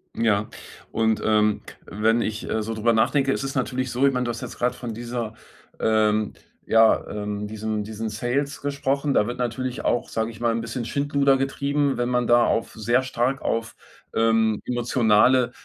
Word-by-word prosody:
Ja, 110 -2 +1 0.4
und, 110 -1 +1
ähm, 105 -1 +2 0.2
wenn 110 +3 +1
ich, 110 0 -3
äh, 110 - 0
so 115 +1 -3
drüber 115 +2 +2
nachdenke, 135 +5 +2
es - - -1
ist 135 0 -4
natürlich 130 -1 -1
so, 130 +3 +2
ich 135 - +2
meine, 125 -1 0
du - - -2
hast 115 -1 -4
jetzt - - -7
gerade 125 0 0
von 120 -3 -6
dieser 115 -1 -4 0.5
ähm, 110 -1 +2 0.4
ja, 115 0 +4
ähm, 105 0 -4
diesem 110 0 -3
diesen 110 0 -4
Sales 125 +6 -2
gesprochen. 140 0 -1
Da 105 - +3
wird 120 +1 -4
natürlich 125 +1 -3
auch, 120 - 0
sage 110 0 -2
ich 110 0 -13
mal, 120 -1 +2
'n 115 - -1
bisschen 115 +1 -4
Schindluder 140 0 +2
getrieben, 140 0 0
wenn 120 0 0
man 125 -1 +1
da 120 0 +5
auf 115 - 0
sehr 120 +4 +1
stark 130 +1 -1
auf, 115 0 -2 0.4
ähm, 110 -1 +2
emotionale, 120 0 +3
120 Hz, 185 wpm, -24 LUFS, 110-130 Hz, 0.5 s, da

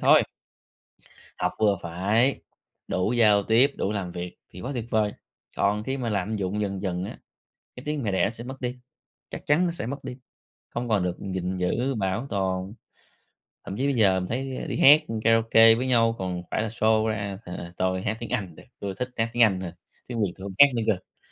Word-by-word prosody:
thôi. - - +6 1.2
Học - - 0
vừa 105 -2 +3
phải, 100 +10 +1 0.5
đủ 90 +4 0
giao 105 -4 +5
tiếp, 120 +7 +4
đủ 100 - -1
làm 100 -4 -3
việc 90 0 -6
thì 90 - -11
quá 130 - -4
tuyệt 120 -3 -3
vời. 105 -2 +1 0.4
Còn 105 +1 +1
khi 135 +4 -2
mà 120 -3 -2
lạm 100 +1 -1
dụng 100 +1 -2
dần 100 -2 -3
dần 90 -2 -2
á, - - -7 0.6
cái 125 - -10
tiếng 150 -3 -2
mẹ 105 - 0
đẻ 95 - +2
nó - - +2
sẽ 115 +1 -9
mất 130 +2 -8
đi, 125 0 -3 0.5
chắc - - -8
chắn 150 +5 +3
nó 175 - 0
sẽ 165 - -4
mất 135 +3 -5
đi, 130 -1 -7 0.5
không 120 0 -4
còn 105 -4 +2
được 90 -1 -2
gìn 95 -1 -3
giữ, 120 +9 0
bảo 105 +4 -1
tồn. 95 0 -2 0.9
Thậm 95 - -5
chí 130 - 0
bây 140 -2 +1
giờ 95 -4 +4
mình 90 - -4
thấy 130 - -4
đi 125 - -3
hát 150 +3 +8 0.2
karaoke 115 0 +6
với 125 +3 -2
nhau 115 -2 +3
còn 90 -1 -3
phải - - 0
là 115 - -1
show 110 0 +2
ra 100 -3 -3
là 85 -1 -7
tôi 95 0 0
hát 110 +3 -2
tiếng 120 - -6
Anh 100 -9 -2
được, - - -14 0.2
tôi 100 -1 -4
thích 125 0 -2
hát 115 0 +1
tiếng 120 - +5
Anh 95 -5 +3
thôi, 90 -2 -5 0.4
tiếng 120 -2 -4
Việt 95 - 0
tôi 95 - -10
hông 100 - -6
hát 145 - +12
nữa 115 - 0
cơ. 100 -4 -2
110 Hz, 220 wpm, -26 LUFS, 95-120 Hz, 1.2 s, hát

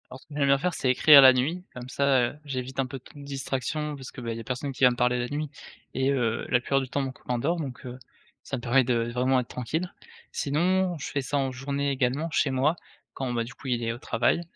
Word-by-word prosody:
Alors 130 - -9
ce - - -23
que 150 - -11
j'aime 140 -1 +2
bien 140 0 +5
faire, 180 +5 -1
c'est 130 - -1
écrire 140 +3 +8
la 130 -1 +10
nuit 145 +8 -1
comme 125 0 -8
ça, 130 -3 +2
heu, - - -16
j'évite 130 -2 -3
un - - -1
peu 130 +1 -7 0.2
de 145 - -10
distraction, 140 +2 -3
parce 130 -3 -9
que, - - -10
ben 115 -1 -4
il - - -6
y - - -5
a - - -9
personne 130 +4 -4
qui 130 - -3
va 125 - +9
me 120 - -5
parler 125 0 +2
la 120 0 -1
nuit 150 +1 -3 0.4
et 130 +1 +1
heu, 120 -4 0
la 125 - +4
plupart 135 +2 +1
du 130 - -6
temps, 140 +2 -1
mon 135 -1 -3
copain 125 -2 -4
dort 160 +8 +1
donc 130 -4 -7
heu, 125 0 -7 0.5
ça 135 - -4
me - - -7
permet 130 +2 +3
de 120 -1 0
vraiment 130 +1 +2
être 125 - -4
tranquille. 160 +9 -3 0.4
Sinon, 180 +5 +1
je 145 - -5
fais 140 - -1
ça 135 +2 -2
en 135 -1 0
journée 140 +2 -2
également 135 +4 0
chez 145 - +2
moi, 135 +5 +2 0.4
quand 130 -2 -3
ben 115 -1 -1
du 130 - -10
coup, 135 - -11
il 120 -1 0
est 115 - -1
au 120 - -9
travail 120 +7 +1
135 Hz, 270 wpm, -27 LUFS, 125-140 Hz, 0.5 s, la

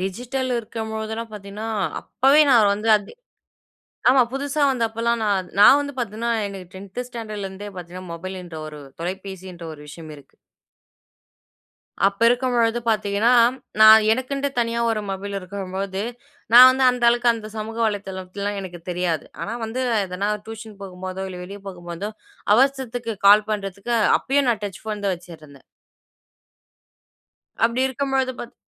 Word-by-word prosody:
Digital 245 +8 -3
இருக்கும்பொழுதெல்லாம் 220 0 -5
பார்த்தீங்கன்னா, 210 +2 -7 0.3
அப்பவே 275 +3 +3
நான் 215 -4 +5
வந்து 215 +2 -1
அது 205 - -12 1.0
ஆமா, 260 0 +6
புதுசா 285 +2 -2
வந்தப்பல்லாம் 235 -2 0
நா - - 0 0.3
நா 205 - +9 0.2
வந்து 285 -1 -5
பாத்தீங்கன்னா, 230 +1 -2 0.2
எனக்கு 190 -3 -10
10த்து 200 +6 -7
ஸ்டாண்டர்ட்லருந்தே 205 -4 -6
பாத்தீங்கன்னா, 180 +1 -9
மொபைலுன்ற 180 -1 -7
ஒரு 150 -1 -9 0.2
தொலைபேசின்ற 185 0 -6
ஒரு 150 - -13
விஷயம் 155 +1 -10
இருக்கு. 140 - -19 1.7
அப்ப 200 +1 -1
இருக்கும்பொழுது 240 -2 +1
பார்த்தீங்கன்னா, 215 +1 +2 0.5
நான் 220 0 +9
எனக்குன்ட்டு 275 +3 -1
தனியா 235 0 -1
1 220 -1 -1
மொபைல் 200 +1 -5
இருக்கும்பொழுது, 190 +1 -5 0.5
நான் 250 +2 +11
வந்து 260 0 +1
அந்த 250 -1 -2
அளவுக்கு 240 0 +3
அந்த 220 -2 -7
சமூக 220 +1 -5
வலைத்தளத்துலல்லாம் 200 0 -4
எனக்கு 175 -3 -8
தெரியாது. 175 -3 -1 0.2
ஆனா 215 - -4
வந்து 230 +4 -3 0.2
எதனா 185 +3 -3 0.2
டியூஷன் 220 -2 -9
போகும்போதோ, 185 0 -6
இல்ல 180 -1 -8
வெளியே 200 +2 -9
போகும்போதோ, 175 +2 -6 0.4
அவசரத்துக்கு 245 -3 0
கால் 210 +1 +7
பண்றதுக்கு 200 +2 -3
அ - - +3 0.2
அப்பயும் 275 -1 +1
நான் 215 -3 -2
டச் 195 -4 -6
ஃபோன் 210 -2 -4
தான் 195 - +1
வச்சுருந்தேன். 155 -5 -14 2.0
அப்படி 235 +2 +1
இருக்கும்பொழுது 265 0 -1
பார்த் 235 - -9
210 Hz, 130 wpm, -22 LUFS, 190-235 Hz, 2.0 s, நான்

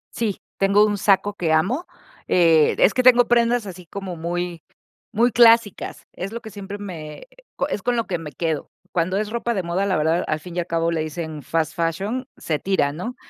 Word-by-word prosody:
Sí, 220 -4 -2 0.2
tengo 200 +2 +4
un 205 -1 0
saco 200 +1 +2
que 165 -5 0
amo. 215 - +1 0.4
Eh, 165 -4 +4
es 195 - +5
que 255 - +1
tengo 245 -1 +6
prendas 235 -1 +2
así 180 -2 -9
como 190 0 -6
muy, 175 0 -3 0.5
muy 235 +3 +3
clásicas. 230 -2 +3
Es 195 +4 -6
lo 235 - -5
que 220 - -9
siempre 200 0 -7
me 170 - -8 0.4
es 210 - -3
con 245 +4 0
lo 230 -1 -1
que 180 - -1
me 160 -2 -8
quedo. 160 +1 -2 0.2
Cuando 180 +2 0
es 210 0 -1
ropa 235 0 -1
de 190 -4 -2
moda, 175 +3 -1
la 195 -2 +1
verdad, 160 +3 +1
al 155 - -1
fin 175 +1 -10
y - - +2
al 175 - -2
cabo, 165 0 0
le 165 -1 -1
dicen 155 -1 -5
fast 160 +4 -1
fashion, 195 +10 -2
se 155 -3 -2
tira, 190 -7 +1
¿no?, 185 +12 -6
185 Hz, 210 wpm, -22 LUFS, 165-215 Hz, 0.5 s, tengo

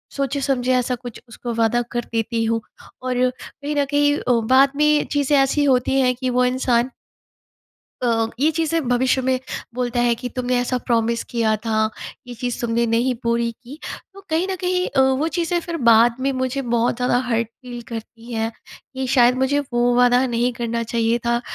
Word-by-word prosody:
सोचे-समझे 270 -2 0
ऐसा 250 0 0
कुछ 245 -1 -10
उसको 240 0 -6
वादा 230 +1 +2
कर 240 0 -2
देती 225 0 0
हूँ। 225 0 0 0.4
और 255 0 +1
कहीं 290 +3 -7
न 285 -1 +2
कहीं 290 0 +3
अ, 250 - -1 0.2
बाद 270 +1 +6
में 300 0 +3
चीज़ें 285 0 +2
ऐसी 275 +2 +2
होती 265 -1 +2
हैं 250 -1 +2
कि 255 0 -2
वो 250 0 +2
इंसान 250 -1 +1 1.1
अ, 225 -2 +2
ये 295 +3 +4
चीज़ें 325 +1 0
भविष्य 255 +1 +2
में 260 0 +1 0.4
बोलता 245 -1 -1
है 240 -1 +3
कि 245 +2 -6
तुमने 250 0 0
ऐसा 250 +1 -1
प्रॉमिस 235 -1 +1
किया 225 -2 +1
था 220 -1 +1 0.4
ये 245 - -7
चीज़ 245 +1 -3
तुमने 235 0 +1
नहीं 235 +3 +1
पूरी 235 0 +1
की। 280 +6 -11 0.3
तो 395 - -13
कहीं 325 +4 +1
न 375 - -1
कहीं 360 0 0
अ, 270 - +2
वो 265 +4 +2
चीज़ें 345 +2 -1
फ़िर 340 0 -5
बाद 230 +1 +5
में 275 +1 0
मुझे 260 +1 -2
बहुत 235 -1 0
ज़्यादा 250 0 +1
हर्ट 230 -1 0
फ़ील 245 0 -10
करती 230 +1 -9
हैं 225 0 -1 0.4
कि 265 0 -3
शायद 245 -1 +4
मुझे 270 +2 +1
वो 240 0 +2
वाला 245 +1 +4
नहीं 240 +1 0
करना 235 0 -2
चाहिए 230 0 0
था। 235 0 +1
250 Hz, 185 wpm, -21 LUFS, 235-270 Hz, 1.1 s, बाद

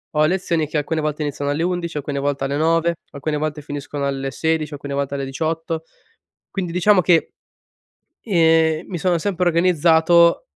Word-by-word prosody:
ho 150 0 +4
lezioni 170 -2 0
che 155 - -3
alcune 155 +2 -1
volte 150 0 -2
iniziano 145 0 -3
alle 150 +3 -1
11, 175 -3 -2
alcune 140 -1 -3
volte 140 -1 -1
alle 140 - -2
9, 165 +2 +2 0.2
alcune 150 +1 -3
volte 150 0 -3
finiscono 145 0 -5
alle 135 0 -3
16, 160 +1 -1
alcune 140 -1 -6
volte 140 0 -2
alle 140 -1 -3
18. 160 +3 -3 0.7
Quindi 180 -4 -3
diciamo 185 +2 +4
che, 170 -1 +2 0.9
ehm, 160 -4 +3
mi 180 - -4
sono 175 +2 +1
sempre 180 -1 0
organizzato 170 0 +4
160 Hz, 165 wpm, -20 LUFS, 145-170 Hz, 0.9 s, ho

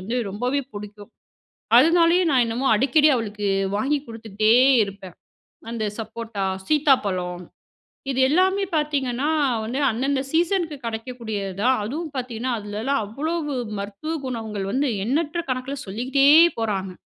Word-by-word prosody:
வந்து 225 +7 -3
ரொம்பவே 250 +7 -1
புடிக்கும். 205 0 -9 0.7
அதனாலேயே 335 +5 +5
நான் 255 -3 +4
என்னமோ 240 +4 -2
அடிக்கடி 295 +7 +4
அவளுக்கு 210 -3 -3 0.3
வாங்கி 280 +7 +1
குடுத்துட்டே 220 -1 0 0.3
இருப்பேன். 195 -3 -9 0.6
அந்த 225 -2 -3
சப்போட்டா, 220 -2 -5 0.2
சீத்தாப்பழம், 200 - +1 0.7
இது 260 - -2
எல்லாமே 375 +5 +2
பார்த்தீங்கன்னா, 285 -2 0 0.3
வந்து 245 +6 -3
அந்தந்த 265 +4 -1
சீசனுக்கு 340 -2 0
கிடைக்கக்கூடியது 220 -4 -5
தான். 255 +1 +3
அதுவும் 305 +7 -4
பார்த்தீங்கன்னா, 245 0 -3
அதுலெல்லாம் 215 +7 -2
அவ்வளவு 295 +5 -3 0.2
மருத்துவ 205 +11 -5
குணங்கள் 220 -5 -4
வந்து, 275 +3 +1 0.2
எண்ணற்ற 310 +6 -1
கணக்கில 255 +2 -4
சொல்லிக்கிட்டே 260 +7 +1 0.3
போறாங்க. 195 -4 -2
245 Hz, 115 wpm, -23 LUFS, 210-290 Hz, 0.7 s, அதனாலேயே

